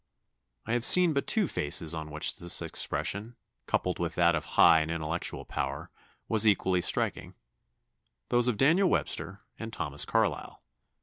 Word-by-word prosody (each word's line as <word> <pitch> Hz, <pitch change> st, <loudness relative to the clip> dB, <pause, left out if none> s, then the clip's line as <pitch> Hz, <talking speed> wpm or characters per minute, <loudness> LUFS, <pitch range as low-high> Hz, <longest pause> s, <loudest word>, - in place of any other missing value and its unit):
I 115 Hz, -, -3 dB
have 120 Hz, -1 st, -1 dB
seen 180 Hz, +4 st, +7 dB
but 140 Hz, -, -3 dB
two 220 Hz, -3 st, +2 dB
faces 80 Hz, -, 0 dB
on 80 Hz, -1 st, -7 dB
which 75 Hz, +1 st, 0 dB
this 85 Hz, 0 st, -1 dB
expression, 110 Hz, +4 st, -2 dB, 0.3 s
coupled 90 Hz, -, -2 dB
with 85 Hz, -1 st, -4 dB
that 85 Hz, 0 st, +3 dB
of 75 Hz, -2 st, -3 dB
high 80 Hz, -1 st, +6 dB
and 80 Hz, -, -4 dB
intellectual 85 Hz, +1 st, -4 dB
power, 70 Hz, +2 st, -5 dB, 0.4 s
was 110 Hz, -1 st, +3 dB
equally 95 Hz, -3 st, +1 dB
striking -, -, -1 dB, 0.9 s
those 120 Hz, 0 st, +2 dB
of 120 Hz, -4 st, -1 dB
Daniel 170 Hz, -, +2 dB
Webster 100 Hz, 0 st, -3 dB, 0.2 s
and 115 Hz, 0 st, -7 dB
Thomas 75 Hz, -8 st, 0 dB
Carlyle. -, -, -2 dB
90 Hz, 150 wpm, -28 LUFS, 80-120 Hz, 0.9 s, seen